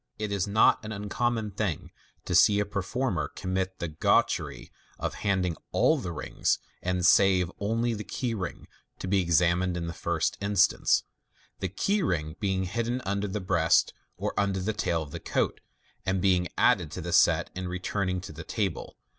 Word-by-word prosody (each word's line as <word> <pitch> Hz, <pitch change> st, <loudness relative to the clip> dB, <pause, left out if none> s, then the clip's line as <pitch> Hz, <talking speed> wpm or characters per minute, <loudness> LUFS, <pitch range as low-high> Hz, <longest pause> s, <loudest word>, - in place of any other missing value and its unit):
It 105 Hz, -1 st, -3 dB
is 100 Hz, -1 st, 0 dB
not 105 Hz, +3 st, +4 dB
an 105 Hz, -, -6 dB
ncommon 105 Hz, 0 st, -2 dB
thing 100 Hz, -8 st, -2 dB, 0.3 s
to -, -, -3 dB
see 105 Hz, -1 st, +6 dB
a 105 Hz, -, +1 dB
performer 100 Hz, -, -2 dB
commit 95 Hz, 0 st, -3 dB
the 85 Hz, -, -3 dB
gauchene 75 Hz, -1 st, 0 dB, 0.3 s
of -, -, -3 dB
handing 95 Hz, -4 st, 0 dB, 0.2 s
all -, -, +3 dB
the 85 Hz, -, -4 dB
rings, 75 Hz, -, -1 dB, 0.4 s
save 90 Hz, -1 st, +4 dB
only 115 Hz, +3 st, 0 dB
the 105 Hz, -1 st, -4 dB
key 120 Hz, +1 st, -3 dB
ring, 95 Hz, -5 st, -5 dB, 0.3 s
to -, -, -6 dB
be 95 Hz, +1 st, +3 dB
examined 90 Hz, +1 st, +2 dB
in 85 Hz, -, -3 dB
the 85 Hz, -, -4 dB
first 85 Hz, -1 st, -1 dB
instance; 100 Hz, -1 st, +3 dB, 0.6 s
the 95 Hz, -, -2 dB
key 200 Hz, -, 0 dB
ring 80 Hz, -, -1 dB
being 95 Hz, -3 st, 0 dB
hidden 115 Hz, +6 st, -2 dB
under 100 Hz, +1 st, -1 dB
the 105 Hz, +2 st, -3 dB
breast 85 Hz, -3 st, +3 dB, 0.2 s
or -, -, -2 dB
under 100 Hz, -1 st, +1 dB
the 105 Hz, +4 st, -1 dB
tail 85 Hz, -6 st, 0 dB
of 75 Hz, -, -12 dB
the -, -, -6 dB
coat, -, -, -1 dB, 0.4 s
and 95 Hz, 0 st, 0 dB
being 90 Hz, -1 st, +2 dB
added -, -, +3 dB
to -, -, -5 dB
the -, -, -4 dB
set -, -, +4 dB
in 95 Hz, 0 st, -4 dB
returning 95 Hz, +1 st, -2 dB
to -, -, -8 dB
the 80 Hz, +2 st, -8 dB
table. 105 Hz, +2 st, -3 dB
95 Hz, 175 wpm, -28 LUFS, 90-105 Hz, 0.6 s, see